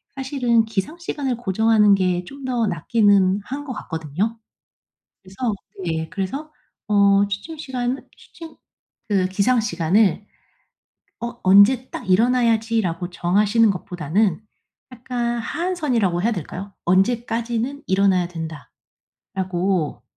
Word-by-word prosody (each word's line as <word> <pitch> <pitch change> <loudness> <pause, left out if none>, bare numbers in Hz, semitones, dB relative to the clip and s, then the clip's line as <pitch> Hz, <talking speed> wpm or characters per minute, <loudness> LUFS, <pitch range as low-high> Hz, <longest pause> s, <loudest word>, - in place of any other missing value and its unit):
사실은 260 -4 +1
기상 220 - -3
시간을 285 -6 -2
고정하는 220 -1 +3
게 180 -2 0
좀 275 +5 -10
더 245 -3 0
낫기는 200 +1 +3
한 280 +6 -6
것 265 - -5
같거든요. 170 - -3 0.8
그래서 205 +4 -3 0.3
네 160 -1 -2
그래서 275 +11 -4 0.3
어 200 -1 +4
취침 205 +12 -5
시간을 260 -3 -3
취침 330 -2 -13 0.5
그 195 -3 +2
기상 205 +6 +2
시간을 200 +1 +1 0.9
어 235 +1 -5
'언제 200 +7 +5
딱 190 - -6
일어나야지.' 230 +1 +3
라고 175 -2 -3
정하시는 205 +6 +2
것보다는 180 +1 -1 0.5
약간 240 -1 -3
하한선이라고 250 - -1
해야 230 +3 +2
될까요? 195 +2 -6
'언제까지는 235 - 0
일어나야 190 -2 +2 0.9
된다.'라고 185 -3 -2
215 Hz, 270 characters per minute, -22 LUFS, 190-245 Hz, 0.9 s, 언제